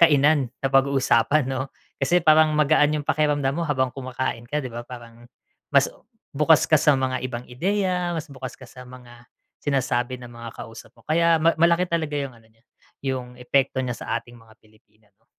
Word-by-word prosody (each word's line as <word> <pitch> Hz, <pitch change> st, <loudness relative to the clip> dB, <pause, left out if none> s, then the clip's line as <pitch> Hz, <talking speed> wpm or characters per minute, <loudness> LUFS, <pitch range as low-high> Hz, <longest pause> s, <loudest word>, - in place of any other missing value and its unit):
kainan 145 Hz, -4 st, +4 dB, 0.2 s
napag-uusapan 135 Hz, 0 st, +3 dB
'no. 130 Hz, +1 st, -3 dB, 0.3 s
Kasi 165 Hz, +6 st, +3 dB
parang 155 Hz, 0 st, +5 dB
magaan 150 Hz, 0 st, +3 dB
yung 145 Hz, -, -4 dB
pakiramdam 145 Hz, -2 st, +1 dB
mo -, -, 0 dB
habang 130 Hz, -3 st, +1 dB
kumakain 130 Hz, -2 st, -4 dB
ka 150 Hz, +1 st, -1 dB
di -, -, -4 dB
ba, 120 Hz, +1 st, -6 dB
parang 120 Hz, -1 st, -11 dB, 0.5 s
mas -, -, +5 dB, 0.5 s
bukas 150 Hz, +1 st, +4 dB
ka 155 Hz, -, +6 dB
sa 150 Hz, 0 st, +4 dB
mga 130 Hz, -1 st, -1 dB
ibang 120 Hz, -2 st, -4 dB
ideya, 180 Hz, +5 st, -1 dB
mas 160 Hz, -1 st, -5 dB
bukas 130 Hz, -1 st, -7 dB
ka 130 Hz, -, -14 dB
sa 125 Hz, 0 st, -12 dB
mga 120 Hz, -1 st, -14 dB, 0.4 s
sinasabi 130 Hz, -3 st, -1 dB
ng 120 Hz, -, -10 dB
mga 115 Hz, -1 st, -9 dB
kausap 115 Hz, 0 st, -11 dB
mo. 115 Hz, -, -22 dB
Kaya 165 Hz, 0 st, +3 dB
ma 165 Hz, 0 st, +3 dB
malaki 170 Hz, +2 st, +3 dB
talaga 160 Hz, -3 st, -2 dB
yung 135 Hz, -3 st, -5 dB
ano 115 Hz, -, -21 dB
niya, 115 Hz, +1 st, -34 dB, 0.4 s
yung 130 Hz, -2 st, -3 dB
epekto 130 Hz, +1 st, +1 dB
niya 125 Hz, -2 st, -3 dB
sa -, -, -3 dB
ating 120 Hz, +1 st, -16 dB
mga 110 Hz, -1 st, -20 dB
Pilipino 105 Hz, 0 st, -28 dB
'no. 115 Hz, -, -39 dB
135 Hz, 185 wpm, -23 LUFS, 120-155 Hz, 0.5 s, ka